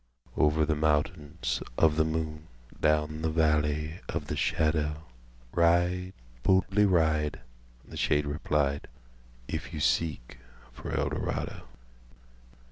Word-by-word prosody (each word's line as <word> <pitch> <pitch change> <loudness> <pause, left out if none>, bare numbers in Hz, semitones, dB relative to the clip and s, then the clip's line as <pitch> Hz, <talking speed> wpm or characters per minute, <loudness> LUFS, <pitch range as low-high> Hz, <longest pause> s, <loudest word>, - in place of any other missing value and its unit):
""Over 75 0 +3
the 80 - +1
mountainsOf 75 -1 0
the 80 - +3
Moon, 80 0 -3 0.3
Down 75 0 +1
the 80 - 0
Valley 75 0 +1
of 75 -2 -3
the 75 - -1
Shadow, 75 -1 0 0.5
Ride, 85 +2 +2 0.3
boldly 95 +4 +3
ride,"The 75 -8 -2
shade 75 0 +2
replied 75 -1 0 0.6
"If 80 0 -4
you - - -4
seek 75 -6 0 0.3
for - - -8
Eldorado!" - - -2
75 Hz, 100 wpm, -29 LUFS, 75-80 Hz, 0.6 s, Over